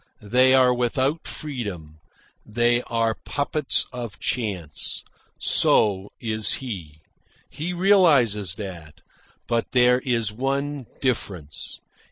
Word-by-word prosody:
They 130 +5 +4
are 130 -1 +5
without 130 +5 0
freedom. 100 - -6 0.4
They 120 +2 +1
are 115 -1 +1
puppets 145 0 0
of 120 -5 -6
chance. 95 -11 -3 0.3
So 100 -2 +3
is 110 -2 +1
he. 85 - -6 0.5
He 165 +4 -4
realises 145 - +4
that. 90 -7 -9 0.4
But 115 -1 -1
there 125 0 +5
is 115 -5 -1
one 135 +2 -2
difference. 95 - -3
120 Hz, 100 wpm, -24 LUFS, 100-130 Hz, 0.5 s, are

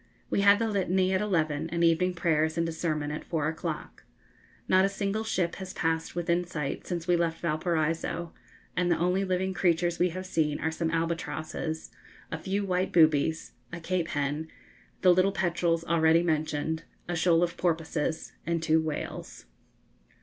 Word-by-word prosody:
We - - +2
had 200 0 +7
the 225 +1 0
Litany 190 -2 +1
at 190 - +2
eleven, 160 -6 0
and 170 0 0
evening 175 +2 +3
prayers 160 -2 +1
and 165 0 +1
a - - -2
sermon 155 -3 -2
at 150 - -5
four 155 -3 -1
o'clock. 160 +1 -5 0.6
Not 185 0 +5
a 195 - +3
single 200 +2 -2
ship 180 -6 -1
has 190 -1 -7
passed 160 0 -1
within 175 0 +1
sight 150 -5 -4
since 170 -2 -3
we 175 - +4
left 165 -1 0
Valparaiso, 165 0 -1 0.4
and 180 -1 +1
the 170 - +3
only 180 +3 +1
living 190 0 0
creatures 175 -1 +1
we 180 - +3
have 185 +2 -6
seen 155 -5 0
are 160 - -1
some 160 0 -1
albatrosses, 165 -1 -3 0.4
a 165 - -3
few 195 +4 -1
white 185 0 0
boobies, 160 -1 +3 0.2
a 170 - -5
cape 170 0 -1
hen, 145 +2 -2 0.5
the 180 -1 +7
little 185 +2 +3
petrels 170 -3 0
already 165 0 +4
mentioned, 155 -1 -1 0.3
a 175 - -2
shoal 170 0 +3
of 170 -1 -1
porpoises, 160 -2 -1
and 170 0 -1
two 160 0 +3
whales. 155 - -5
170 Hz, 170 wpm, -28 LUFS, 160-180 Hz, 0.6 s, had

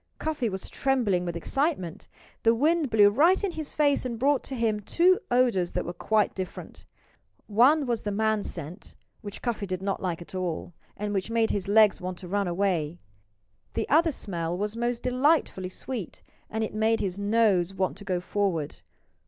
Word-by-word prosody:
Cuffy 305 -7 -1
was 190 -1 -5
trembling 230 -10 0
with 170 -1 -3
excitement. 270 - -2 0.3
The 230 0 +4
wind 310 +3 +2
blew 205 -2 +6
right 335 - +4
in 395 - 0
his 315 -3 -7
face 290 -2 +3
and 245 -2 -4
brought 275 +3 +2
to 270 - -5
him 225 -3 0
two 350 - +3
odors 240 -8 +2
that - - -2
were 175 - -4
quite 215 +2 +1
different. 185 -1 -7 0.6
One 260 +8 +4
was 240 -3 -1
the 205 - -3
man 220 +1 +1
scent, 170 0 -7 0.3
which 205 -3 -9
Cuffy 225 -5 -2
did 185 0 -4
not 195 0 -2
like 175 -3 -2
at 170 - -12
all, 180 -2 -3 0.2
and 210 0 -3
which 195 +1 -2
made 230 -1 +1
his 200 -2 -2
legs 210 -1 +5
want 180 0 -4
to 180 - -9
run 200 +1 0
away. 175 -3 0 0.8
The - - -1
other 325 +2 +4
smell 175 - -3
was 210 +2 -2
most 240 0 -2
delightfully 255 - +1
sweet. 215 -1 -6 0.3
And 220 +1 -2
it 220 - -4
made 220 +1 +2
his 190 0 -3
nose 205 -4 +2
want 190 -1 -1
to 205 - -9
go 185 -3 -1
forward. 180 -5 -2
210 Hz, 185 wpm, -27 LUFS, 185-250 Hz, 0.8 s, blew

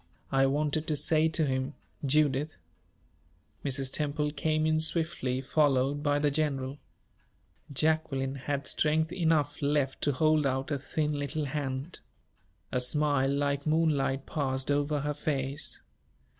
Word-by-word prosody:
I 135 0 +4
wanted 150 +2 0
to 155 - +1
say 155 +2 +3
to 160 0 0
him 130 +1 -2 0.3
Judith 145 - +1 0.5
" 80 -2 -37
Mrs. 135 -1 -1
Temple 150 0 0
came 155 +1 0
in 155 0 +2
swiftly, 160 -5 0
followed 140 0 +2
by 145 -1 +2
the 145 0 +2
general. 140 -2 -1 0.9
Jacqueline 140 -2 0
had 140 +1 -3
strength 160 +2 +1
enough 160 -5 +1
left 140 -2 0
to 145 - +2
hold 155 +1 +3
out 130 +2 -2
a 140 - 0
thin 150 +2 -1
little 145 +1 -2
hand. 140 +2 -4 0.7
A 125 - 0
smile 145 +1 +2
like 140 +1 0
moonlight 150 -4 +1
passed 135 -2 -1
over 145 +1 +1
her 150 +1 -1
face. 140 -2 -2
145 Hz, 135 wpm, -29 LUFS, 135-155 Hz, 0.9 s, I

